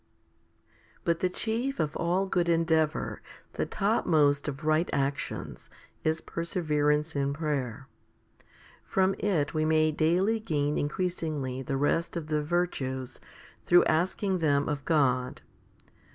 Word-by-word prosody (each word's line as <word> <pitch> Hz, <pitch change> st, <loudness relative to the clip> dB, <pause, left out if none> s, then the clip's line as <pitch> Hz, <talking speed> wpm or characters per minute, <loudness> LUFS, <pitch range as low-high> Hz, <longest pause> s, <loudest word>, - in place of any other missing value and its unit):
2. -, -, -29 dB
But 170 Hz, -1 st, +1 dB
the 185 Hz, 0 st, +1 dB
chief 235 Hz, +8 st, -2 dB
of 150 Hz, -2 st, -1 dB
all 180 Hz, +3 st, +1 dB
good 175 Hz, -3 st, 0 dB
endeavour, 160 Hz, -2 st, +1 dB, 0.3 s
the -, -, -2 dB
topmost 155 Hz, -9 st, +2 dB
of 140 Hz, +1 st, -5 dB
right 155 Hz, +2 st, +2 dB
actions, 140 Hz, 0 st, -3 dB, 0.3 s
is 160 Hz, +1 st, 0 dB
perseverance 155 Hz, -3 st, 0 dB
in 140 Hz, 0 st, 0 dB
prayer. 135 Hz, -5 st, -3 dB, 1.0 s
From 190 Hz, 0 st, +1 dB
it 165 Hz, -9 st, 0 dB
we 155 Hz, -1 st, +1 dB
may 155 Hz, 0 st, +3 dB
daily 180 Hz, +8 st, +2 dB
gain 150 Hz, -8 st, -1 dB
increasingly 150 Hz, -5 st, -2 dB
the 135 Hz, +1 st, -2 dB
rest 165 Hz, +5 st, 0 dB
of 155 Hz, -2 st, -6 dB
the 150 Hz, -1 st, +1 dB
virtues 135 Hz, -6 st, -2 dB, 0.4 s
through 175 Hz, -, +5 dB
asking 185 Hz, +4 st, +1 dB
them 145 Hz, -3 st, +2 dB
of 145 Hz, -2 st, -3 dB
God. 130 Hz, -6 st, +1 dB
155 Hz, 125 wpm, -28 LUFS, 145-175 Hz, 1.0 s, through